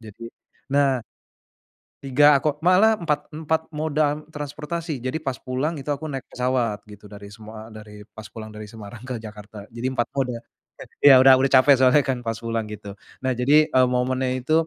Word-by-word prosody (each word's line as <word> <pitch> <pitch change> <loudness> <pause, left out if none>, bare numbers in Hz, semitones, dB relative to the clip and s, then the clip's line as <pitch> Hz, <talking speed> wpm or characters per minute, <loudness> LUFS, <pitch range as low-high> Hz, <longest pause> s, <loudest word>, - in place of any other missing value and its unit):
jadi 110 0 -13 0.5
nah. 135 -4 +2 1.0
3 140 +1 +4
kok 150 +3 -3
malah 195 +5 +5
empat 150 -5 -2
empat 160 0 -3
moda 150 -1 -1
transportasi 150 -1 -6
jadi 130 +5 -3
pas 135 -5 -4
pulang 130 +7 -3
itu 145 0 -5
aku 145 +2 -4
naik 135 -3 -5
pesawat 125 -4 -1
gitu 105 0 -14
dari 100 0 -11
semua 110 +1 -11
dari 105 -1 -12
pas 110 - -9
pulang 110 -1 -9
dari 105 0 -9
Semarang 110 +1 -11
ke 125 -3 -5
Jakarta 105 -1 -11
jadi 120 +3 -4
4 120 -2 -1
moda, 130 -2 -1 0.7
iya 135 -3 +9
udah 130 0 +8
udah 135 +1 +1
capek 135 +1 +6
soalnya 130 +3 +5
kan 130 -2 -1
pas 115 -1 -4
pulang 115 -1 -3
gitu 105 -1 -9 0.3
nah 130 - 0
jadi, 145 +5 +4
eee, 130 0 +3
momennya 130 +1 0
itu, 145 +5 -2
130 Hz, 175 wpm, -23 LUFS, 110-145 Hz, 1.0 s, iya